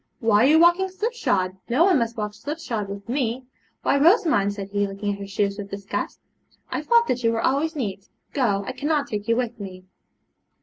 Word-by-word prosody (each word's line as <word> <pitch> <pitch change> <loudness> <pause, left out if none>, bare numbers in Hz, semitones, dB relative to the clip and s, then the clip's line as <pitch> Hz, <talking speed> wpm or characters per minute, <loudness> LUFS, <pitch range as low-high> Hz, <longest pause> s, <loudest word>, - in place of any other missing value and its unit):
'Why 225 -2 +4
are - - +6
you 310 +2 +6
walking 345 +3 +4
slipshod? 280 - -1
no 270 +9 +4
one 370 -7 +4
must 230 0 -2
walk 210 -1 -3
slipshod 235 -3 -4
with 200 0 -7
me. 250 0 -1 0.4
Why, 280 - +2
Rosamond,' 310 - +4
said 200 -1 -6
he, 205 0 0
looking 200 +1 -3
at 200 - -8
her 200 - -6
shoes 200 +1 -1
with 200 -1 -6
disgust, 200 0 -4 0.5
'I - - -1
thought 470 0 +4
that 245 0 -1
you 230 - +3
were 225 0 -1
always 310 +5 +1
neat. 200 -8 -4 0.3
Go; 205 -8 +1
I - - -3
cannot 290 +2 0
take 210 -5 -5
you 230 - +3
with 240 -1 -2
me.' 185 -2 -8
230 Hz, 205 wpm, -24 LUFS, 200-290 Hz, 0.5 s, are